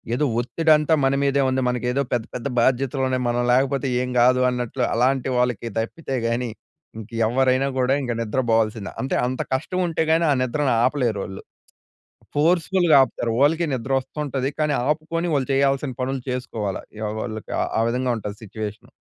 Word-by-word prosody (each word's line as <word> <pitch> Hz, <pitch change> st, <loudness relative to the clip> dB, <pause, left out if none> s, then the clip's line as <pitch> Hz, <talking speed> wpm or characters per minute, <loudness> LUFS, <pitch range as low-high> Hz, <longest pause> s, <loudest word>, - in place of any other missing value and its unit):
ఏదో 150 Hz, -, +1 dB
ఒత్తిడంతా 155 Hz, +4 st, +2 dB
మన 135 Hz, 0 st, +3 dB
మీదే 140 Hz, 0 st, +2 dB
ఉంది. 130 Hz, 0 st, 0 dB
మనకేదో 125 Hz, +2 st, 0 dB
పెద్ద, 120 Hz, -2 st, 0 dB
పెద్ద 125 Hz, +2 st, -3 dB
బాధ్యతలున్నాయి. 130 Hz, +1 st, +1 dB
మనం 120 Hz, 0 st, 0 dB
లేకపోతే 135 Hz, +2 st, +1 dB
ఏం 125 Hz, -, -2 dB
కాదు, 125 Hz, +1 st, +5 dB
అన్నట్లు 125 Hz, 0 st, -2 dB
అలాంటి 130 Hz, +2 st, +1 dB
వాళ్ళకి 125 Hz, -2 st, 0 dB
తప్పితే 135 Hz, +5 st, -4 dB
గాని, 120 Hz, +1 st, -1 dB, 0.5 s
ఇంక 110 Hz, -, -9 dB, 0.2 s
ఎవ్వరైనా 130 Hz, +2 st, +2 dB
గూడా 130 Hz, +1 st, +2 dB
ఇంక 125 Hz, -, -2 dB
నిద్ర 115 Hz, +3 st, -1 dB
బోవాల్సిందే. 110 Hz, -2 st, 0 dB
అంటే, 135 Hz, -, -1 dB
అంత 130 Hz, +1 st, -2 dB
కష్టం 180 Hz, +7 st, -3 dB
ఉంటే 165 Hz, -1 st, 0 dB
గాని 165 Hz, +1 st, +3 dB
ఆ -, -, +5 dB
నిద్రను 135 Hz, +2 st, 0 dB
ఆపలేరోళ్ళు. 115 Hz, -8 st, -1 dB, 0.9 s
ఫోర్స్‌ఫు‌ల్‌గా 170 Hz, +2 st, +3 dB
ఆపుతారు. 120 Hz, -3 st, -3 dB
వాళ్ళకీ 160 Hz, +4 st, +3 dB
నిద్రొస్తుంటది. 135 Hz, +2 st, -2 dB
కానీ 150 Hz, -1 st, +1 dB, 0.2 s
ఆపుకొని, 165 Hz, +3 st, -1 dB
వాళ్ళు 135 Hz, -1 st, -1 dB
చేయాల్సిన 135 Hz, 0 st, +1 dB
పనులు 130 Hz, +1 st, -2 dB
చేసుకోవాల. 115 Hz, -6 st, -3 dB, 0.4 s
వాళ్ళకి 110 Hz, -2 st, -6 dB, 0.3 s
ఆ -, -, +3 dB
విధంగా 125 Hz, +1 st, 0 dB
ఉంటది 105 Hz, -1 st, -6 dB
సిట్యుయేషను. 105 Hz, 0 st, -7 dB
130 Hz, 150 wpm, -23 LUFS, 120-140 Hz, 0.9 s, కాదు